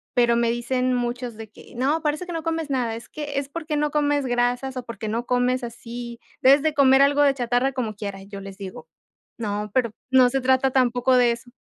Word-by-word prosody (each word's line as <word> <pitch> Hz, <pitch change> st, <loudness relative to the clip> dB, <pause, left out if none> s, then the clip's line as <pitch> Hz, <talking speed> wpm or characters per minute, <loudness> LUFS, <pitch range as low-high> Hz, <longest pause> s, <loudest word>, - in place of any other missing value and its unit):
pero 240 Hz, -1 st, +4 dB
me 235 Hz, 0 st, +2 dB
dicen 250 Hz, +2 st, 0 dB
muchos 245 Hz, -1 st, -3 dB
de 220 Hz, -1 st, -10 dB
que: -, -, -16 dB
"No, 280 Hz, +6 st, +1 dB
parece 300 Hz, +3 st, -1 dB
que 350 Hz, -, -6 dB
no 325 Hz, -, -3 dB
comes 325 Hz, -2 st, -2 dB
nada, 240 Hz, -4 st, 0 dB
es 230 Hz, -, -9 dB
que 290 Hz, -2 st, -5 dB
es 280 Hz, -, -1 dB
porque 310 Hz, -1 st, -3 dB
no 295 Hz, 0 st, 0 dB
comes 290 Hz, -1 st, +1 dB
grasas 245 Hz, +2 st, 0 dB
o 250 Hz, -, -4 dB
porque 230 Hz, -2 st, -6 dB
no 230 Hz, +3 st, -2 dB
comes 250 Hz, 0 st, +1 dB
así, 235 Hz, 0 st, -7 dB, 0.2 s
debes 275 Hz, +3 st, +6 dB
de 310 Hz, -1 st, +1 dB
comer 270 Hz, -1 st, +5 dB
algo 285 Hz, +1 st, +3 dB
de 280 Hz, -1 st, +5 dB
chatarra 245 Hz, +1 st, 0 dB
como 225 Hz, -5 st, -3 dB
quiera". 200 Hz, -2 st, -6 dB
Y -, -, -15 dB
yo 200 Hz, -1 st, -8 dB
les 195 Hz, -1 st, -9 dB
digo: 185 Hz, -5 st, -9 dB, 0.5 s
"No, 210 Hz, -1 st, -3 dB
pero 235 Hz, -4 st, +1 dB, 0.2 s
no 255 Hz, -1 st, +6 dB
se 270 Hz, +1 st, -1 dB
trata 260 Hz, +1 st, +3 dB
tampoco 255 Hz, 0 st, +2 dB
de 245 Hz, -1 st, +4 dB
eso". 240 Hz, +1 st, -11 dB
250 Hz, 225 wpm, -23 LUFS, 235-275 Hz, 0.5 s, debes